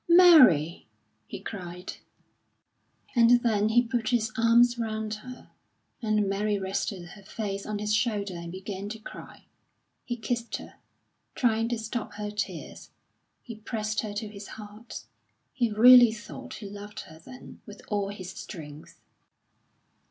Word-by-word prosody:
"Mary!" 260 Hz, -, +7 dB, 0.4 s
he -, -, -7 dB
cried. 180 Hz, -3 st, -7 dB, 1.2 s
And 240 Hz, 0 st, +5 dB
then 215 Hz, -3 st, +2 dB
he 240 Hz, +2 st, +4 dB
put 230 Hz, -1 st, -2 dB
his 230 Hz, -3 st, +1 dB
arms 235 Hz, +1 st, +4 dB
round 220 Hz, -1 st, -3 dB
her, 250 Hz, +4 st, -10 dB, 0.5 s
and 215 Hz, -2 st, +1 dB
Mary 205 Hz, +1 st, 0 dB
rested 190 Hz, -2 st, -3 dB
her 205 Hz, -, -13 dB
face 200 Hz, -1 st, -5 dB
on 215 Hz, -1 st, -2 dB
his 210 Hz, +1 st, -1 dB
shoulder 215 Hz, -3 st, 0 dB
and 170 Hz, -1 st, -7 dB
began 195 Hz, +2 st, -6 dB
to 220 Hz, -, -6 dB
cry. 215 Hz, -, -11 dB, 0.6 s
He 240 Hz, -, -3 dB
kissed 230 Hz, +1 st, -3 dB
her, -, -, -9 dB, 0.6 s
trying 225 Hz, -2 st, +1 dB
to 240 Hz, -, -1 dB
stop 225 Hz, +1 st, -5 dB
her 210 Hz, 0 st, -5 dB
tears; 210 Hz, 0 st, -5 dB, 0.5 s
he 235 Hz, -, -8 dB
pressed 215 Hz, -1 st, -3 dB
her 215 Hz, -2 st, -3 dB
to 215 Hz, +1 st, -4 dB
his 205 Hz, -1 st, -10 dB
heart. 215 Hz, +2 st, -10 dB, 0.5 s
He 240 Hz, -3 st, +1 dB
really 240 Hz, +2 st, +8 dB
thought 210 Hz, -1 st, -9 dB
he 210 Hz, -, -8 dB
loved 205 Hz, +1 st, -8 dB
her 160 Hz, 0 st, -14 dB
then 255 Hz, +10 st, -13 dB
with 205 Hz, -1 st, -11 dB
all 205 Hz, -2 st, -1 dB
his 185 Hz, -3 st, -7 dB
strength. 150 Hz, -3 st, -10 dB
215 Hz, 145 wpm, -27 LUFS, 200-230 Hz, 1.2 s, really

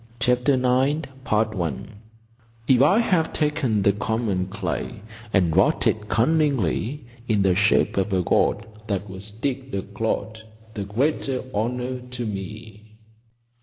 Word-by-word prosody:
CHAPTER 125 Hz, +3 st, +2 dB
IX 130 Hz, +4 st, +2 dB, 1.7 s
"If 130 Hz, -2 st, +5 dB
I 150 Hz, +9 st, +5 dB
have 180 Hz, -8 st, +2 dB
taken 150 Hz, -9 st, 0 dB
the 100 Hz, -, +4 dB
common 105 Hz, -3 st, -1 dB
clay 105 Hz, +1 st, -4 dB, 0.3 s
And 90 Hz, -6 st, +2 dB
wrought 95 Hz, +3 st, +3 dB
it 105 Hz, -1 st, 0 dB
cunningly 135 Hz, -, +1 dB, 0.2 s
In 105 Hz, -3 st, +2 dB
the 95 Hz, -1 st, +4 dB
shape 105 Hz, +2 st, +3 dB
of 100 Hz, +1 st, +1 dB
a 95 Hz, -2 st, +1 dB
god -, -, +2 dB, 0.2 s
that 100 Hz, -1 st, -2 dB
was 95 Hz, +2 st, -9 dB
digged 130 Hz, +3 st, -4 dB
a 95 Hz, -, -2 dB
clod, 110 Hz, +2 st, -3 dB, 0.3 s
The 100 Hz, -2 st, -4 dB
greater 130 Hz, +4 st, -1 dB
honour 125 Hz, +4 st, -2 dB
to 125 Hz, -1 st, -6 dB
me." 105 Hz, +1 st, -8 dB
110 Hz, 130 wpm, -24 LUFS, 100-130 Hz, 1.7 s, If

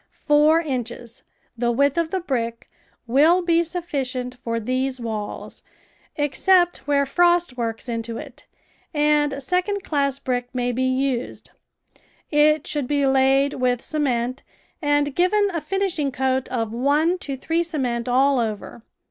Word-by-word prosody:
Four 300 Hz, +2 st, +5 dB
inches 240 Hz, -5 st, -5 dB, 0.2 s
— -, -, -44 dB
the 235 Hz, 0 st, 0 dB
width 280 Hz, +4 st, +2 dB
of 335 Hz, -1 st, 0 dB
the 375 Hz, +2 st, -2 dB
brick 235 Hz, -7 st, -3 dB, 0.2 s
— -, -, -39 dB
will 335 Hz, +6 st, +5 dB
be 340 Hz, -1 st, +3 dB
sufficient 275 Hz, -8 st, -3 dB
for 230 Hz, -2 st, -4 dB
these 255 Hz, +3 st, -2 dB
walls, 220 Hz, -3 st, -6 dB, 0.5 s
except 350 Hz, +4 st, +2 dB
where 280 Hz, -1 st, +2 dB
frost 345 Hz, 0 st, +2 dB
works 230 Hz, 0 st, -4 dB
into 230 Hz, -1 st, -4 dB
it, -, -, -11 dB, 0.5 s
and 295 Hz, -2 st, +2 dB
second 365 Hz, +6 st, -1 dB
class 280 Hz, -5 st, 0 dB
brick 250 Hz, -2 st, -3 dB
may 245 Hz, 0 st, 0 dB
be 255 Hz, +2 st, -1 dB
used; 260 Hz, -1 st, -2 dB, 0.8 s
it 300 Hz, 0 st, +3 dB
should 290 Hz, -4 st, -2 dB
be 285 Hz, 0 st, +1 dB
laid 270 Hz, +1 st, +3 dB
with 250 Hz, -1 st, 0 dB
cement 255 Hz, -4 st, -1 dB, 0.4 s
and 290 Hz, -1 st, +1 dB
given 395 Hz, +5 st, +2 dB
a 335 Hz, -, -2 dB
finishing 340 Hz, -4 st, -1 dB
coat 260 Hz, 0 st, -1 dB
of 225 Hz, -3 st, -2 dB
one 295 Hz, +8 st, +1 dB
to 275 Hz, -6 st, -5 dB
three 325 Hz, +5 st, 0 dB
cement 255 Hz, -8 st, -2 dB
all 265 Hz, +2 st, +3 dB
over. 225 Hz, 0 st, -4 dB
275 Hz, 145 wpm, -22 LUFS, 250-315 Hz, 0.8 s, Four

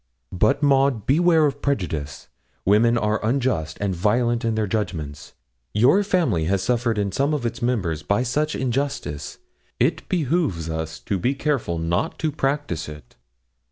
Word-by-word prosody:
'But, 105 Hz, +10 st, +2 dB
Maud, 135 Hz, -6 st, +3 dB
beware 160 Hz, +2 st, +4 dB
of 145 Hz, -1 st, -2 dB
prejudice; 80 Hz, -, -2 dB, 0.4 s
women 115 Hz, +4 st, +4 dB
are 105 Hz, -1 st, 0 dB
unjust 115 Hz, -, 0 dB
and 100 Hz, -2 st, -1 dB
violent 115 Hz, +6 st, +1 dB
in 115 Hz, -1 st, 0 dB
their 110 Hz, -1 st, +1 dB
judgments. 85 Hz, -9 st, -4 dB, 0.4 s
Your 125 Hz, -, +5 dB
family 165 Hz, -, +1 dB
has 95 Hz, +2 st, 0 dB
suffered 120 Hz, -1 st, 0 dB
in 100 Hz, -1 st, 0 dB
some 140 Hz, +8 st, +1 dB
of 135 Hz, -5 st, -3 dB
its 115 Hz, 0 st, -3 dB
members 100 Hz, -11 st, 0 dB
by 100 Hz, +9 st, +1 dB
such 150 Hz, +5 st, 0 dB
injustice. 130 Hz, -, -3 dB, 0.4 s
It -, -, 0 dB
behoves 145 Hz, -, 0 dB
us 80 Hz, +1 st, -4 dB
to 100 Hz, -, -2 dB
be 125 Hz, +9 st, 0 dB
careful 135 Hz, -, -1 dB
not 85 Hz, -, -1 dB
to 160 Hz, -1 st, -1 dB
practise 140 Hz, -, -2 dB
it.' 75 Hz, -5 st, -12 dB
115 Hz, 155 wpm, -23 LUFS, 90-140 Hz, 0.4 s, Your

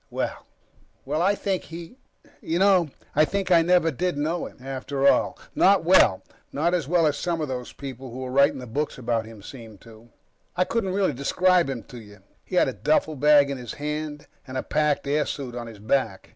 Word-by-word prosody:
Well... -, -, -4 dB, 0.6 s
Well, 150 Hz, +4 st, -1 dB
I 200 Hz, +3 st, +3 dB
think 195 Hz, -2 st, -2 dB
he 170 Hz, +9 st, -10 dB, 0.4 s
You 165 Hz, -, -2 dB
know, 185 Hz, -4 st, +4 dB, 0.3 s
I 155 Hz, -, +5 dB
think 190 Hz, +3 st, -2 dB
I 170 Hz, -1 st, +7 dB
never 170 Hz, -1 st, +3 dB
did 180 Hz, +3 st, -2 dB
know 160 Hz, +4 st, -2 dB
him, -, -, -15 dB
after 135 Hz, +1 st, -2 dB
all. -, -, +3 dB, 0.2 s
Not -, -, +4 dB
well. -, -, +5 dB, 0.3 s
Not 165 Hz, +5 st, 0 dB
as 170 Hz, -6 st, 0 dB
well 170 Hz, 0 st, +3 dB
as 150 Hz, -2 st, +2 dB
some 170 Hz, -2 st, -2 dB
of 155 Hz, -, -2 dB
those 125 Hz, -2 st, -5 dB
people 135 Hz, -2 st, -8 dB
who're 130 Hz, +1 st, -6 dB
writing 140 Hz, +2 st, +4 dB
the 125 Hz, -, -7 dB
books 145 Hz, +6 st, -3 dB
about 115 Hz, -3 st, -1 dB
him 110 Hz, -3 st, -13 dB
seem 115 Hz, -4 st, -11 dB
to. 115 Hz, +1 st, -16 dB, 0.5 s
I 180 Hz, -, +4 dB
couldn't 195 Hz, -1 st, -2 dB
really 195 Hz, -1 st, +1 dB
describe 175 Hz, +5 st, +2 dB
him 125 Hz, -4 st, -4 dB
to 125 Hz, -, -11 dB
you. 105 Hz, -2 st, -14 dB, 0.3 s
He 185 Hz, -, -7 dB
had 180 Hz, -, +4 dB
a 130 Hz, -, -2 dB
duffelbag 150 Hz, -1 st, +3 dB
in 135 Hz, -, -4 dB
his 120 Hz, -3 st, -7 dB
hand 150 Hz, 0 st, -5 dB, 0.2 s
and 130 Hz, 0 st, -5 dB
a -, -, -2 dB
packed 150 Hz, -1 st, 0 dB
airsuit 140 Hz, -3 st, -2 dB
on 120 Hz, -1 st, -6 dB
his 115 Hz, -2 st, -10 dB
back. 110 Hz, -1 st, -1 dB
145 Hz, 200 wpm, -24 LUFS, 130-170 Hz, 0.6 s, I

